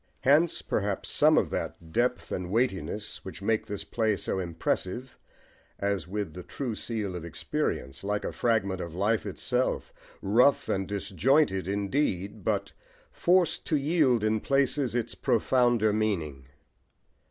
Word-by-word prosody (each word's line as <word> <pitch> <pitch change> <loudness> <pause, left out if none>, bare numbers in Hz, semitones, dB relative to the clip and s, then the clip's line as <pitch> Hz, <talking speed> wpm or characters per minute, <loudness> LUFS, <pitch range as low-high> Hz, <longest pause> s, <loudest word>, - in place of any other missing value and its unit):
Hence 150 +5 +3
perhaps 100 -1 -1
some - - +4
of - - +2
that 80 -1 -5
depth 125 +5 0
and 90 -1 -3
weightiness 105 -1 -1
which 95 0 -8
make 110 +1 0
this 100 -2 -4
play 110 -1 0
so 95 - -2
impressive, 95 +7 -2 0.6
as 100 -4 -1
with 100 -3 -3
the 90 - -7
true 125 +6 -4
seal 105 -4 -3
of 85 - -5
experience, 70 -4 -3
like 105 +1 -1
a - - -2
fragment 100 -6 0
of 85 -1 -6
life 105 +3 +1
itself, 125 +6 -1 0.3
rough 120 +8 +3
and 95 0 -1
disjointed 100 - +1
indeed, 100 -1 -1
but - - -1 0.4
forced 175 -1 +2
to 155 - +2
yield 140 -6 +2
in 110 0 +2
places 135 0 +1
its 120 -1 -1
profounder 120 -3 +2
meaning. 80 -11 -1
105 Hz, 140 wpm, -28 LUFS, 95-125 Hz, 0.6 s, some